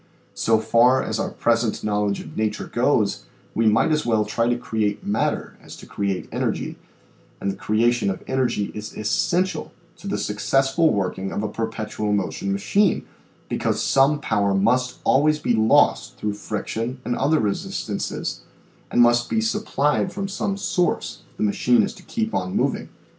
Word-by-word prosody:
So 115 -1 +2
far 115 +4 +4
as - - -2
our - - -1
present 115 -1 0
knowledge 105 -1 0
of - - -11
nature 110 -1 -1
goes - - +1 0.3
we 115 0 +2
might 110 +8 +3
as 155 0 +2
well 110 -3 +1
try 115 +3 0
to 120 - +1
create 110 -4 -2
matter 105 +2 -1
as - - -11
to - - -12
create 100 -2 -3
energy, - - -2 0.6
and 100 - -1
the - - -7
creation 115 +1 +1
of 95 - -4
energy 130 -6 0
is 105 0 -7
essential 175 - 0 0.3
to 200 - -10
the 200 - -1
successful 135 +9 +2
working 95 -1 -2
of 105 - -2
a - - 0
per 115 +1 -2
petual 105 -1 -2
motion 100 0 -2
machine 185 - +1 0.4
because - - -1
some 140 +2 +3
power 100 -7 +1
must 125 +6 +1
always 150 +3 +3
be 135 - 0
lost 110 0 +3
through 105 -1 -2
friction 115 +4 -4
and 120 - -1
other 155 +4 +2
resistances 105 -2 -3 0.5
and 120 - +5
must 120 0 +3
be 225 - +1
supplied 205 -7 0
from 195 +2 -3
some 195 0 -2
source 185 -3 -1
if - - -30
the - - -1
machine 120 +4 +3
is - - -2
to - - -15
keep 225 -1 -3
on 90 0 -2
moving. - - 0
115 Hz, 170 wpm, -23 LUFS, 105-140 Hz, 0.6 s, and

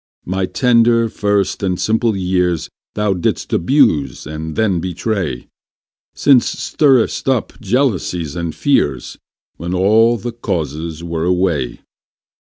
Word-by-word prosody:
My 95 +1 -1
tender, 115 -1 +3
first, 100 -2 0
and 90 -3 -1
simple 110 0 +1
years 90 -3 0 0.2
Thou 105 -1 +1
didst 90 -3 -2
abuse 85 - +2
and 80 0 -6
then 100 -6 +1
betray; 90 - -3 0.7
Since 135 -4 +3
stirdst 135 -6 +1
up 125 -4 -1
jealousies 95 - -1
and 85 -2 -4
fears, 70 - 0 0.4
When 85 +3 -4
all 110 +5 +4
the 120 +3 -5
causes 85 -7 -4
were 85 -1 -3
away. 90 -8 0
95 Hz, 115 wpm, -17 LUFS, 85-115 Hz, 0.7 s, all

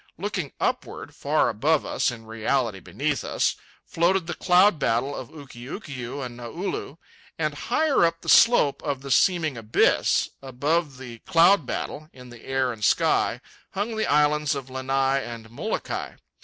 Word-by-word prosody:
Looking 190 -6 -3
upward, - - -3
far - - +1
above 150 +7 +1
us - - 0
(in 115 -2 -8
reality 115 -1 -1
beneath - - -2
us) - - 0 0.3
floated 175 +2 +1
the 175 - -4
cloud 180 -1 +4
battle 135 +2 0
of 125 - -7
Ukiukiu 135 - -7
and 120 -1 -8
Naulu. 150 - -5 0.4
And 155 -2 -1
higher 275 - +1
up 165 0 +1
the - - -13
slope 230 - +5
of 140 -2 -3
the 140 - -6
seeming 160 -7 +2
abyss, 110 0 +2
above 140 +3 -1
the 120 -3 -9
cloud 170 -3 +5
battle, 155 +4 -5
in 125 -1 -13
the 120 -1 -13
air 135 -2 0
and 110 -2 -10
sky, - - +2 0.3
hung 210 +4 -2
the 220 - -1
islands 150 0 +2
of 135 -2 -7
Lanai 135 +1 0
and 115 -1 -9
Molokai. 120 - -4
140 Hz, 155 wpm, -25 LUFS, 125-170 Hz, 0.4 s, slope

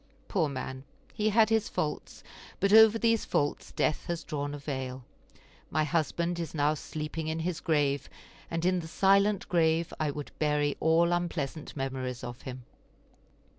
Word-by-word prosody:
Poor 165 -7 +1
man; 130 -1 -5 0.3
he 215 0 +1
had 220 +1 +4
his 220 0 +2
faults, 150 -1 -4 0.4
but 200 +1 +2
over 220 0 +8
these 230 -1 +2
faults 145 0 -1
death 155 - 0
has 170 -1 -3
drawn 145 -2 -3
a - - -5
veil. 130 -3 -5 0.6
My 155 +1 +1
husband 170 +3 0
is 165 -1 -4
now 150 0 +3
sleeping 155 +1 -5
in 160 0 -1
his 170 0 -2
grave, 145 -5 +1 0.4
and 165 +1 -2
in 185 0 +3
the 165 - -6
silent 195 +3 +3
grave 165 -1 +2
I 155 -1 +1
would 145 0 -6
bury 150 -1 +1
all 165 +2 +3
unpleasant 165 -4 -3
memories 130 -2 -3
of 120 0 -7
him. 130 -1 -8
160 Hz, 160 wpm, -29 LUFS, 145-175 Hz, 0.6 s, over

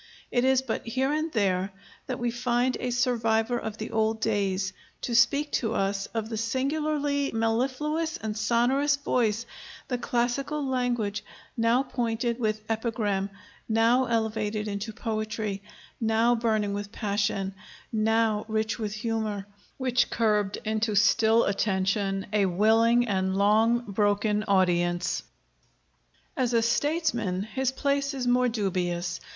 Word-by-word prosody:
It 245 - +2
is 265 0 +3
but 235 -4 -3
here 265 +4 0
and 310 +1 -1
there 195 -4 +1 0.4
that 255 -2 -3
we 240 0 -1
find 245 +1 0
a 250 - -2
survivor 240 -1 +1
of 220 -1 -5
the 220 - -6
old 220 0 +1
days 195 -3 0 0.3
to 240 - -3
speak 280 +5 +3
to 225 -2 0
us 195 0 -1
of 225 -1 -3
the 225 -1 -4
singularly 285 +4 0
mellifluous 265 +8 0
and 215 -1 -4
sonorous 245 +6 +2
voice, 235 -5 0 0.4
the 250 -2 -1
classical 255 +5 -1
language, 245 -5 -1 0.3
now 230 +3 +3
pointed 235 -2 -2
with 215 -2 -1
epigram, 220 -3 -1 0.4
now 230 +3 +3
elevated 220 -2 -1
into 205 +2 -4
poetry, 215 -2 -3 0.4
now 225 +1 +3
burning 220 -3 0
with 205 0 -5
passion, 200 -3 -1 0.4
now 220 -1 +2
rich 220 +1 -1
with 210 -2 -3
humor, 215 -3 -2 0.3
which 250 -2 +1
curbed 210 -3 +1
into 215 0 0
still 225 +2 +4
attention 195 0 0
a 205 -2 +3
willing 225 +6 +3
and 190 -2 0
long 220 +4 +4
broken 205 0 +1
audience." 175 -3 +1 1.1
As 250 -2 0
a 230 - +3
statesman 235 - 0
his 260 +4 -1
place 280 +1 0
is 255 -2 -3
more 250 0 +3
dubious. 180 -5 -2
225 Hz, 130 wpm, -27 LUFS, 210-245 Hz, 1.1 s, still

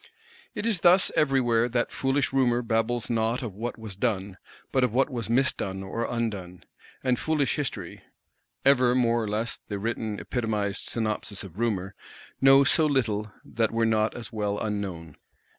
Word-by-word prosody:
It 210 - -3
is 220 -6 +1
thus 180 +2 +5
everywhere 120 -5 +2
that 120 0 0
foolish 135 0 0
Rumour 125 -2 +2
babbles 115 +1 0
not 115 +2 0
of 115 -5 -5
what 115 +5 -5
was 110 -4 -8
done, 100 -3 -2 0.3
but 130 -2 +2
of 125 - +2
what 135 +5 +2
was 120 -3 -4
misdone 115 -6 0
or 115 +5 -3
undone; 100 -7 -4 0.4
and 125 -2 +1
foolish 155 -3 0
History 145 -3 -4 0.6
(ever, 130 -3 +5
more 120 -2 +2
or - - -3
less, 110 +3 -2
the 100 - -3
written 110 0 -3
epitomised 105 -5 -2
synopsis 110 -3 -1
of 95 0 -11
Rumour) 100 -5 -1 0.5
knows 135 0 +6
so 160 -2 +3
little 110 -7 0
that 115 -1 0
were 115 0 +1
not 110 -1 +1
as 115 -2 -8
well 105 -2 -1
unknown. 95 -8 -4
115 Hz, 160 wpm, -26 LUFS, 105-130 Hz, 0.6 s, knows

